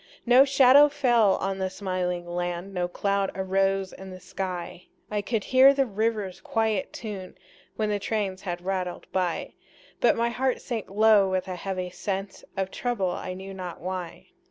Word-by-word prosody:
No 250 +3 +7
shadow 275 +1 +7
fell 240 -8 +3
on 195 0 -2
the 190 0 -1
smiling 185 -2 -3
land, 175 +2 -4
No 180 -1 -1
cloud 200 +2 0
arose 195 0 0
in 190 0 -10
the 185 0 -9
sky; 180 -2 -5 0.3
I 210 -1 0
could 215 +1 -2
hear 265 +2 +6
the 275 -1 +3
river's 210 -4 -2
quiet 220 -4 0
tune 200 -5 -7 0.4
When 215 -1 -1
the 205 - 0
trains 195 -3 -2
had 175 -2 -5
rattled 185 -2 -3
by; 180 -3 -1 0.5
But - - +4
my 235 +1 +1
heart 260 +2 0
sank 230 -4 -5
low 210 -1 +5
with 185 0 -1
a 185 - -4
heavy 185 0 -4
sense 195 +1 -4
Of 190 0 -1
trouble, 220 -7 -1
I 185 - -5
knew 190 +1 -8
not 180 -2 -7
why. 180 -1 -6
195 Hz, 170 wpm, -26 LUFS, 185-220 Hz, 0.5 s, No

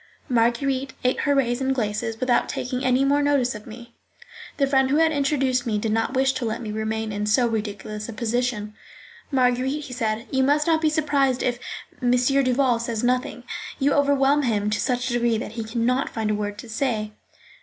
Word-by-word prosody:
Marguerite 260 +3 +1
ate 250 0 +1
her 285 -1 +2
raisins 265 0 +1
glaces 225 -1 -2
without 255 -2 +1
taking 250 +1 -3
any 255 +1 +3
more 285 +1 +3
notice 285 -4 +2
of 210 -1 -10
me. 235 +1 -11 0.6
The 275 - +3
friend 270 -1 +2
who 280 - +2
had 325 0 +4
introduced 270 -4 +1
me 215 -2 0
did 215 +1 -1
not 225 +4 0
wish 265 0 +3
to 260 -2 -3
let 220 -1 -2
me 220 -3 -5
remain 220 0 -2
in 205 0 -2
so 240 +4 +3
ridiculous 215 -1 -4
a - - -5
position. 230 -2 -2 0.6
"Marguerite," 260 +2 +1
he 260 - -8
said, 225 -2 -2
"you 265 - +2
must 290 +3 +3
not 320 -1 +2
be 315 - +3
surprised 285 -4 +1
if 245 -1 0 0.4
M. 245 - +1
Duval 255 -1 +2
says 230 -1 -3
nothing: 250 0 0 0.3
you 280 0 +2
overwhelm 285 0 +3
him 210 -5 0
to 210 - 0
such 250 -1 0
a 245 - -2
degree 240 -1 +2
that 215 - -5
he 225 0 -4
can 230 +1 -2
not 255 +2 +1
find 220 -2 -2
a - - +1
word 205 0 -3
to 240 - -9
say." 225 -2 -2
245 Hz, 200 wpm, -24 LUFS, 225-270 Hz, 0.6 s, had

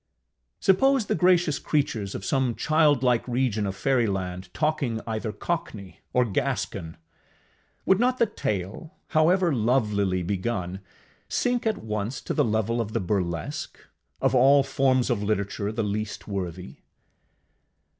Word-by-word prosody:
Suppose 265 +5 +3
the - - 0
gracious 175 -4 +3
creatures 135 -10 -1
of 95 - -5
some 130 -4 +1
childlike 145 -7 +2
region 120 -4 0
of 95 - -4
Fairyland 95 -6 -1
talking 150 -7 -1
either 110 -1 -3
cockney 105 - -5
or 125 -1 +3
Gascon! 105 - -2 0.9
Would 190 0 +4
not 250 +2 +2
the 235 - +4
tale, 105 - -4
however 170 +2 +3
lovelily 105 -6 +1
begun, 95 -1 -2 0.5
sink 245 -2 0
at 215 -2 -1
once 105 +2 -3
to - - -3
the 150 - +2
level 115 0 0
of 110 -1 -5
the 115 - +1
Burlesque 90 -5 -3 0.4
of 135 -1 +1
all 135 +2 +6
forms 135 -2 +1
of 110 -4 0
literature 100 0 -1
the 110 0 -2
least 105 +1 -4
worthy? 90 -7 -5
115 Hz, 130 wpm, -26 LUFS, 100-145 Hz, 0.9 s, all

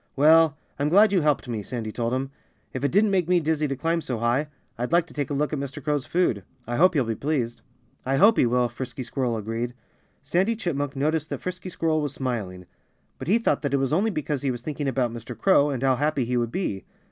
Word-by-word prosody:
"Well 155 +1 +5 0.2
I'm 145 +1 +1
glad 205 +5 +6
you 185 - +4
helped 150 -3 +1
me," 115 -3 -3
Sandy 110 0 -5
told 115 +1 -2
him. 130 +2 -2 0.4
"If 130 - -4
it 140 - +1
didn't 205 +2 +3
make 180 -3 +1
me 180 -1 +4
dizzy 155 -1 0
to 135 - -2
climb 165 +5 0
so 125 -6 -3
high 120 +6 +1 0.3
I'd 125 +4 -3
like 170 0 +4
to - - -16
take 145 -3 -2
a 145 - -2
look 150 +2 0
at 150 - -1
Mr. 140 0 -6
Crow's 145 -3 -1
food. 170 - +1 0.2
I 120 +1 -3
hope 185 +2 +5
he'll 140 - +3
be 115 -1 -2
pleased." 125 -2 -2 0.4
"I 135 +1 0
hope 210 +8 +6
he - - +4
will," 125 +1 +2
Frisky 125 +1 -6
Squirrel 120 -2 -2
agreed. 115 +3 -3 0.5
Sandy 185 +11 +1
Chipmunk 145 - -2
noticed 155 +3 0
that - - -4
Frisky 185 0 -5
Squirrel 160 -3 0
was 145 -2 -3
smiling. 105 -9 -4 0.5
But - - -6
he 205 +6 +4
thought 230 - +1
that 140 -2 0
it - - +3
was 135 +1 0
only 200 +7 +2
because 150 -7 -2
he 140 - 0
was 120 -2 -4
thinking 150 -1 -3
about 130 -3 0
Mr. 115 0 -8
Crow, 145 +1 +4
and 135 -2 -3
how 130 -1 +3
happy 145 -2 0
he 125 +2 -1
would 120 -1 0
be. 110 - -2
140 Hz, 240 wpm, -25 LUFS, 125-160 Hz, 0.5 s, glad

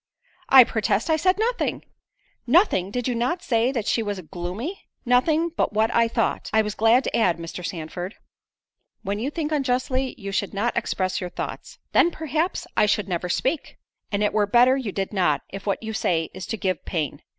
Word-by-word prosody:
I 265 -1 +10
protest 220 +4 0
I - - +5
said 370 +4 +2
nothing——" 470 +3 -1 0.6
"Nothing! 325 - +3
Did 245 +4 -2
not 250 +10 -1
you - - -19
say 235 +1 +2
that 235 -6 -2
she 230 - +1
was 205 -3 -3
gloomy?" 185 - -6 0.2
"Nothing 305 +7 +3
but 330 - -1
what 220 +1 +2
I 230 0 +4
thought—I 225 -1 0
was 210 -1 -3
going 225 +4 +4
to - - -2
add, 180 -7 +2
Mr. 170 +2 -7
Sandford." 175 +3 -5 0.9
"When 200 +2 -2
you 250 +5 -1
think 300 0 -3
unjustly, 260 -2 0
you 200 -4 -6
should 200 0 -2
not 230 +5 0
express 185 -1 -1
your 180 - -4
thoughts." - - -6
"Then, 340 - +5
perhaps, 320 +2 -2
I 210 - +4
should 205 -1 +1
never 180 -1 -2
speak." 270 - -1 0.3
"And 205 0 0
it 210 - +1
were 210 -1 +2
better 245 +4 +5
you 255 -7 -3
did 195 +2 -3
not, 165 -8 +1
if 195 +1 -8
what 200 - -1
you 220 0 -4
say 165 -6 0
is 185 +1 -7
to 225 - -3
give 185 -5 -2
pain. 155 -6 -3
220 Hz, 195 wpm, -24 LUFS, 195-260 Hz, 0.9 s, I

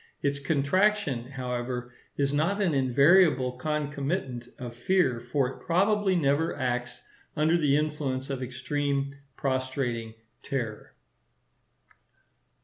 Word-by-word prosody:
Its 140 0 +1
contraction, 145 - +1
however, 125 -2 -4 0.2
is 140 0 +1
not 165 +8 +1
an 185 -6 +2
invariable 140 +1 +4
concomitant 140 -1 -3
of 120 -2 -6
fear; 130 -1 +2
for 125 +3 0
it 135 - -8
probably 195 +2 +2
never 150 0 +1
acts 125 -2 -2 0.3
under 155 +2 +3
the 145 -4 +3
influence 145 -3 -2
of 135 -1 -3
extreme, 140 +2 -2 0.2
prostrating 130 -4 -2 0.3
terror. 115 -6 -4
140 Hz, 105 wpm, -28 LUFS, 125-155 Hz, 0.3 s, invariable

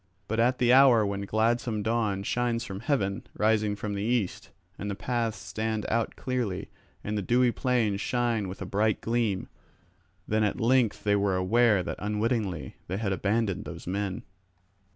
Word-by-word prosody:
But 110 +1 -1
at 125 +2 +3
the 125 0 +4
hour 130 -5 +7
when 100 0 -3
gladsome 110 0 +1
dawn 110 -3 0
shines 120 +2 0
from 95 -5 -6
heaven, 100 -8 0 0.2
rising 105 -1 +2
from 105 0 -4
the 100 - -3
east, 110 -3 -1 0.3
and 105 - -4
the 100 - -2
paths 115 0 -2
stand 110 +2 -3
out 115 0 0
clearly, 120 -8 -3 0.3
and 105 - -3
the 105 - 0
dewy 120 +4 +3
plains 115 -6 0
shine 120 -5 0
with 95 +2 -6
a - - -6
bright 105 +3 +1
gleam, 115 -5 0 0.8
then 110 0 +1
at 105 - 0
length 120 -1 +2
they 105 -1 +3
were 100 -2 +1
aware 105 +1 +3
that - - -5
unwittingly 105 - -2
they 95 - -2
had 100 -2 -1
abandoned 100 +1 0
those - - -8
men. 95 +1 -3
110 Hz, 170 wpm, -28 LUFS, 100-120 Hz, 0.8 s, hour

